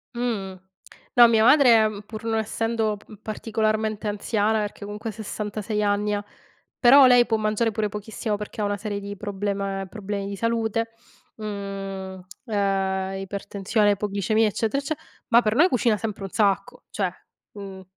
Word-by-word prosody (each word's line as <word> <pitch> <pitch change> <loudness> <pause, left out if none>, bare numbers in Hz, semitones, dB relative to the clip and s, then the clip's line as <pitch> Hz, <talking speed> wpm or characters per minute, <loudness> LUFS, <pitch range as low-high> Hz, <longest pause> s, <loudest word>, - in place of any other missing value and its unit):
Mh-mh. 200 -6 -3 0.6
No, 240 -1 +10
mia 220 -1 +4
madre, 235 -5 +6 0.2
pur 220 0 -8
non 225 -1 0
essendo 220 -1 -1
pa - - -20 0.2
particolarmente 215 0 -1
anziana, 210 +1 0
perché, 205 0 -4
comunque, 210 +2 -5
66 210 0 -4
anni 205 +1 +1
ha, 205 0 -2 0.5
però 265 +2 +8
lei 245 -1 +6
può 225 -1 +1
mangiare 215 +1 +1
pure 210 0 -1
pochissimo 210 +1 -4
perché 210 +1 -6
ha - - +1
una 205 0 -1
serie 205 0 -4
di 200 0 -6
problema 200 -1 -3
problemi 200 -1 -4
di 200 - -4
salute, 230 0 -1 0.4
mhmm, 195 -3 -6 0.2
ehm, 195 -2 0
ipertensione, 200 +2 0
ipoglicemia, 205 +2 +1
eccetera 225 +6 -1
ecce 315 +2 -2 0.3
ma 235 +1 +6
per 215 0 0
noi 335 +6 +6
cucina 230 -3 +2
sempre 215 -3 -5
un 195 - -4
sacco, 200 -2 0
cioè, 195 -3 -1 0.4
mhmm 195 -2 -9
210 Hz, 150 wpm, -24 LUFS, 200-225 Hz, 0.6 s, No